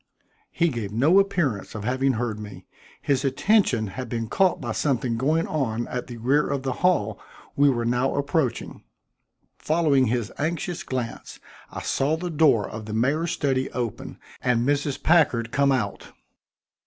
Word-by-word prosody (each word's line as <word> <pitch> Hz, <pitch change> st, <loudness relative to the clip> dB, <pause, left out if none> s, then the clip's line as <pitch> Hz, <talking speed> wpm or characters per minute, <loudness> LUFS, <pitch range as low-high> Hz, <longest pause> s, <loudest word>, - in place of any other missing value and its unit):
He 170 Hz, 0 st, +1 dB
gave 115 Hz, -7 st, -4 dB
no 145 Hz, -, +4 dB
appearance 155 Hz, -, -1 dB
of 105 Hz, -, -5 dB
having 130 Hz, +3 st, +1 dB
heard 110 Hz, -2 st, -3 dB
me; 105 Hz, -1 st, -9 dB, 0.4 s
his 140 Hz, -1 st, +1 dB
attention 135 Hz, -, +2 dB
had 115 Hz, +5 st, -6 dB
been 115 Hz, -2 st, -3 dB
caught 190 Hz, +5 st, +2 dB
by 120 Hz, -3 st, -4 dB
something 125 Hz, -2 st, 0 dB
going 155 Hz, +7 st, +1 dB
on 120 Hz, -6 st, -2 dB
at 125 Hz, -, -4 dB
the 120 Hz, -1 st, -8 dB
rear 135 Hz, +6 st, +2 dB
of 140 Hz, -1 st, -2 dB
the 135 Hz, -, -1 dB
hall 110 Hz, -, +1 dB, 0.3 s
we 145 Hz, 0 st, +5 dB
were 120 Hz, -3 st, 0 dB
now 125 Hz, +3 st, +1 dB
approaching. 140 Hz, -3 st, -1 dB, 0.8 s
Following 150 Hz, -5 st, +2 dB
his 120 Hz, -1 st, -1 dB
anxious 165 Hz, +3 st, -2 dB
glance, 125 Hz, -3 st, -5 dB, 0.3 s
I -, -, -7 dB
saw 145 Hz, +4 st, 0 dB
the 175 Hz, +1 st, -4 dB
door 145 Hz, -8 st, +3 dB
of 110 Hz, 0 st, -7 dB
the 105 Hz, -, -5 dB
mayor's 140 Hz, +9 st, +1 dB
study 130 Hz, -2 st, 0 dB
open 120 Hz, -4 st, -4 dB, 0.2 s
and 125 Hz, -1 st, +1 dB
Mrs. 145 Hz, -1 st, -1 dB
Packard 130 Hz, -9 st, +3 dB
come 140 Hz, -1 st, +3 dB
out. 110 Hz, -7 st, -2 dB
130 Hz, 160 wpm, -24 LUFS, 115-150 Hz, 0.8 s, we